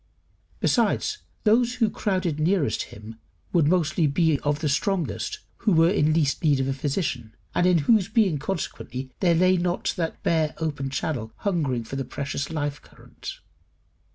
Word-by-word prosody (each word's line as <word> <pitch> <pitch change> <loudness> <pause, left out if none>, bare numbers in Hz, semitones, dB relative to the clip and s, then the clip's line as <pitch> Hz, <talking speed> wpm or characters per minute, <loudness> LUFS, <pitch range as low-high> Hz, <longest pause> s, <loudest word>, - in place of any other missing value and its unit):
Besides, 420 - +1 0.2
those 235 +3 +3
who 230 -3 +2
crowded 185 -7 -1
nearest 155 - +1
him 110 +2 -11 0.3
would 165 -4 +4
mostly 160 -2 +2
be 155 0 +2
of 145 0 0
the 155 +1 -2
strongest 150 - -1 0.2
who 205 - +1
were 165 +2 +5
least 155 -5 +2
in 160 - +3
need 140 -2 +3
of 135 - 0
a 135 - 0
physician, 135 - -3 0.2
and 175 - +3
in 180 -1 +5
whose 210 -2 +4
being 200 -8 +2
consequently 135 -5 -4
there 175 -3 +3
lay 185 +2 +4
not 175 0 -1
that 165 -2 -3
bare 160 -2 +1
open 145 -4 -2
channel 130 -5 -3
hungering 145 - 0
for 135 +4 -6
the 135 - -1
precious 140 +2 -4
life 145 -2 -3
current. - - -11
155 Hz, 160 wpm, -25 LUFS, 140-180 Hz, 0.3 s, were